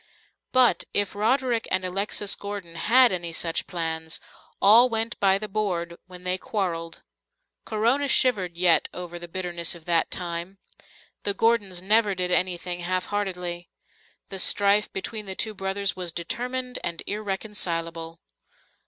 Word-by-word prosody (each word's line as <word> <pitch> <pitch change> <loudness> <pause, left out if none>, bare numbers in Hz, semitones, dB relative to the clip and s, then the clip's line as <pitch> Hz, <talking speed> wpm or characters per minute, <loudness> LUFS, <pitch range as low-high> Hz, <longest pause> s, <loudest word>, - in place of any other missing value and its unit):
But, 255 -2 +4
if 205 -1 +2
Roderick 235 +3 +1
and 185 - +1
Alexis 200 +2 0
Gordon 200 -4 -7
had 240 +8 +5
any 175 -2 -2
such 165 0 -1
plans, 160 -2 -3 0.4
all 230 +5 +7
went 225 0 -1
by 195 -1 +4
the 215 +1 -5
board 180 -5 -2
when 180 -1 -11
they 185 +1 0
quarreled. 170 -6 -3 0.6
Corona 235 +6 +1
shivered 195 -11 +2
yet 175 -2 +4
over 175 -1 -6
the 175 - -8
bitterness 175 -1 -2
of 165 -2 -14
that 170 -1 +2
time. 175 +1 -4 0.6
The 200 - -1
Gordons 205 -5 +1
never 210 0 +3
did 180 0 -1
anything 180 -1 +1
half 185 +1 -1
heartedly. 180 -4 -3 0.6
The 195 -1 -5
strife 200 +2 +3
between 210 +2 -5
the 190 - -4
two 220 +1 -1
brothers 195 0 -1
was 180 -2 -2
determined 250 +9 -2
and 170 -1 -3
irreconcilable. 170 -5 -3
190 Hz, 140 wpm, -25 LUFS, 175-210 Hz, 0.6 s, all